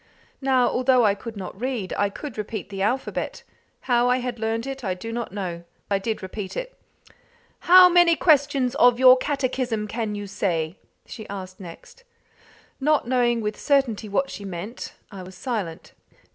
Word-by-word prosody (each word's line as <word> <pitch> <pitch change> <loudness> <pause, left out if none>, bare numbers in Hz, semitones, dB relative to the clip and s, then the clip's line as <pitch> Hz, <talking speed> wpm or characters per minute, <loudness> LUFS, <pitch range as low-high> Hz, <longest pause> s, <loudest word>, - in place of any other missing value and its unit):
Now, 260 -2 +3
although 255 -1 +3
I 205 - +4
could 220 +2 -8
not 190 +1 -8
read, 245 -7 -3
I 205 0 +1
could 275 +5 -8
repeat 215 -1 -5
the 195 -1 -5
alphabet; 245 +7 -2 0.4
how 245 -1 +2
I 250 - +3
had 250 -2 -4
learned 225 +1 -2
it 270 -1 -6
I 185 -3 -1
do 225 +5 -7
not 235 -3 -4
know. 180 -4 -5 0.3
I 200 - +2
did 215 0 -3
repeat 190 0 -6
it. - - -5 0.9
"How 365 0 +10
many 350 -1 +5
questions 285 -6 +3
of 245 -3 +5
your 255 0 +8
catechism 255 -5 -2
can 220 -1 -3
you 205 0 -5
say?" 180 -4 -2 0.3
she 220 -3 -10
asked 185 -2 -7
next. 200 - -12 0.8
Not 295 -2 +2
knowing 240 -2 +2
with 210 0 -3
certainty 255 -7 +1
what 270 +7 0
she 200 - -8
meant, 195 +5 -7 0.2
I 195 -2 -8
was 185 +1 -11
silent. 195 -8 -4
230 Hz, 170 wpm, -24 LUFS, 200-260 Hz, 0.9 s, How